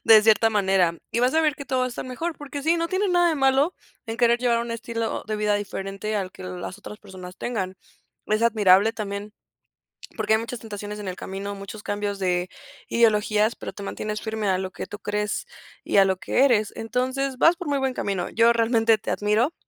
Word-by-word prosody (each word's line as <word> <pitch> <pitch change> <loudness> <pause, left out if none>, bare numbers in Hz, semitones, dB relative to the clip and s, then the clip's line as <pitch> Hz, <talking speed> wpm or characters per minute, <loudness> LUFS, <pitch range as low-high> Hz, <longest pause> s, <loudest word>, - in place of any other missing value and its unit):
de 220 -2 +8
cierta 225 +1 +5
manera, 190 -5 +2
y 235 - +1
vas 255 +4 +2
a 320 - +5
ver 305 -2 +2
que 285 - -8
todo 260 -1 -1
va 255 - +2
a - - -1
estar 245 - -6
mejor, 315 +7 -4
porque 285 -1 -7
sí, 330 +2 +3
no 335 0 -1
tienes 375 +2 0
nada 350 -1 +4
de 325 - +1
malo 270 +5 +3 0.3
en 225 - -4
querer 240 0 +3
llevar 240 -2 +2
un 235 0 -3
estilo 230 0 -3
de 215 0 -2
vida 210 0 +1
diferente, 200 +1 -3
al 190 -2 -3
que - - -11
el 180 -1 -6
las 185 - -6
otras 210 0 -10
personas 185 -3 -11
tengan. 190 -6 -3 0.5
Es 215 +1 +1
admirable 210 -2 +5
también, 205 -1 -5 0.9
porque 220 0 +1
hay 220 - +4
muchas 230 +1 -5
tentaciones 210 -1 -7
en 200 - -6
el 185 - -3
camino, 195 +2 -5
muchos 200 +2 -9
cambios 205 0 -2
de 180 -1 0 0.4
ideologías, 215 -1 +3
pero - - -7
te 200 - -8
mantienes 215 +1 -4
firme 220 -2 -2
a 185 - +2
lo 190 0 -4
que - - -7
tú 205 - -8
crees 210 0 -2 0.4
y - - +1
a 195 - +7
lo 190 -1 +1
que 250 - +1
eres. 215 -5 +2
Entonces, 255 +3 -2
vas 330 +6 +5
por 360 - -6
muy 285 - +1
buen 265 -1 0
camino. 195 -6 -2
Yo 230 +1 +4
realmente 230 -1 +3
te - - -4
admiro 215 +8 +1
215 Hz, 225 wpm, -24 LUFS, 200-245 Hz, 0.9 s, de